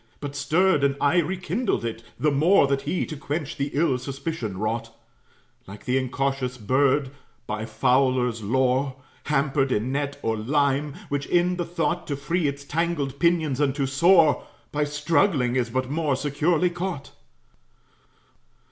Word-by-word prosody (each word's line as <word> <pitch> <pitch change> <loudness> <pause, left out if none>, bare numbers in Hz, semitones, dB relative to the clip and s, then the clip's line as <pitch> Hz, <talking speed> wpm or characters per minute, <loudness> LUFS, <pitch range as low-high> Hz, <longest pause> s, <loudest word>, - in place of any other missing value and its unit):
But 145 -1 -6
stirred 150 +3 +2
and 140 -1 +2
aye 145 +5 +3
rekindled 185 - -1
it, 115 0 -4 0.2
the 150 - +2
more 155 +4 +4
That 135 0 0
he 180 - 0
to 155 - -7
quench 150 +2 -4
the 140 0 -1
ill 140 -4 +1
suspicion 135 - -5
wrought, 110 +3 -2 0.8
Like 100 +2 -11
the 130 +1 +2
incautious 130 0 -2
bird, 130 +4 +1 0.3
by 110 +1 -4
fowler's 125 -2 +1
lore, 130 +4 +1 0.3
Hampered 135 -2 +1
in 120 +3 0
net 140 +1 -2
or 115 - 0
lime; 140 +5 0
which, 145 0 -2
in 175 +1 +2
the 175 - -2
thought 175 0 -2
To 145 - -2
free 155 +4 -1
its 140 0 -4
tangled 150 -3 -2
pinions 160 -6 +2
and 140 -2 +1
to 140 -2 0
soar, 160 +3 +4 0.3
By 150 0 0
struggling 145 -3 +1
is 125 -2 0
but 130 +2 -2
more 150 -3 0
securely 155 +6 +1
caught. 175 -5 -5
140 Hz, 150 wpm, -24 LUFS, 130-160 Hz, 0.8 s, more